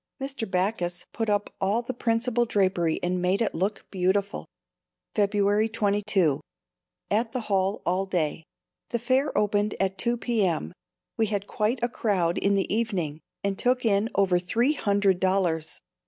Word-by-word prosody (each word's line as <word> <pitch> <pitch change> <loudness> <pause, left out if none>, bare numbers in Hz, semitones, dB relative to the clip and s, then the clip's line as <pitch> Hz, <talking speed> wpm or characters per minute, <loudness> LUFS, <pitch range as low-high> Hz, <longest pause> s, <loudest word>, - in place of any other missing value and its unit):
Mr. 270 -5 -3
Backus 180 -1 -1
put 225 -1 -2
up 205 0 0
all 205 +5 +1
the 255 - -4
principal 240 0 +1
drapery 185 -6 +1
and 180 0 0
made 180 +2 +1
it 230 - 0
look 195 +5 -2
beautiful. 195 +2 0 0.7
February 205 +1 +2
22. 200 -8 +1 0.7
At 225 +2 +1
the 255 - -1
hall 195 -1 0
all 185 +3 0
day. 165 -4 -1 0.5
The 235 - 0
fair 260 +4 +1
opened 205 0 +1
at 195 0 0
2 240 +2 +1
p.m. 195 - 0 0.4
We 225 - +2
had 200 -1 -2
quite 215 +4 0
a - - +4
crowd 185 -8 0
in 200 0 +2
the 195 0 0
evening 180 -10 -2 0.2
and 200 0 -1
took 250 0 +1
in 210 +1 +3
over 185 -3 +3
three 230 +10 +1
hundred 200 -7 +2
dollars. 180 -4 0
200 Hz, 155 wpm, -26 LUFS, 185-225 Hz, 0.7 s, a